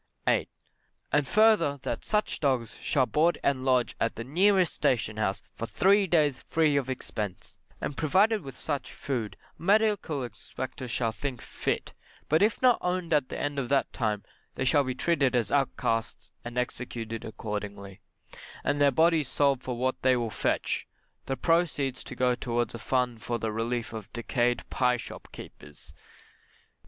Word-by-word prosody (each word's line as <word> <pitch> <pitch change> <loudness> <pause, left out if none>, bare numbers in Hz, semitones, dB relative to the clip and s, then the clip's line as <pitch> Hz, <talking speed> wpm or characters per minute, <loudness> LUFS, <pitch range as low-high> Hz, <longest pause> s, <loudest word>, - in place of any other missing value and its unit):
8. - - +2 0.6
And 145 - +2
further 215 -9 +4
that - - -3
such 210 0 0
dogs 125 -7 0
shall 135 -3 +2
board 160 +6 +2
and 135 -2 +1
lodge 130 -2 +2
at 115 - 0
the 115 - -5
nearest 185 - +3
station 120 -6 0
house 100 -2 -1
for 115 - -5
three 195 - +4
days 150 -6 +2
free 155 -3 +3
of 135 -2 0
expence, 105 -7 -5 0.2
and 140 - -4
provided 200 +9 +3
with 135 -4 -9
such 145 -3 -3
food 120 -6 -4 0.2
a - - -16
medical 200 -7 +2
inspector 125 +3 -7
shall 115 -1 -1
think 125 +2 -4
fit, - - -3 0.4
but 155 +3 +4
if 215 +4 +2
not 250 -2 +6
owned 180 -2 -1
at 145 -4 +2
the - - -5
end 145 -1 -1
of 125 - -3
that 140 -1 +1
time 105 -4 -1 0.3
they 130 - -1
shall 145 +2 +4
be 130 -1 -3
treated 140 -4 +2
as 115 -4 +1
outcasts 115 -5 -1
and 120 +1 -7
executed 115 -2 -3
accordingly; 105 -3 -6 0.6
and 145 - 0
their 145 - +7
bodies 160 +1 +3
sold 140 -1 +2
for 125 -1 -4
what 130 +1 -1
they 130 0 +4
will 115 -2 -2
fetch, - - -1 0.4
the 135 - -1
proceeds 155 -6 +1
to 135 - -8
go 125 0 +2
towards 120 -2 -1
a 115 - -6
fund 125 -2 0
for 120 +1 -2
the 110 -1 -2
relief 115 +2 -2
of 110 -3 -7
decayed 120 0 0
pie 125 -1 +2
shop - - -9
keepers. 75 0 -12
130 Hz, 165 wpm, -28 LUFS, 120-150 Hz, 0.6 s, their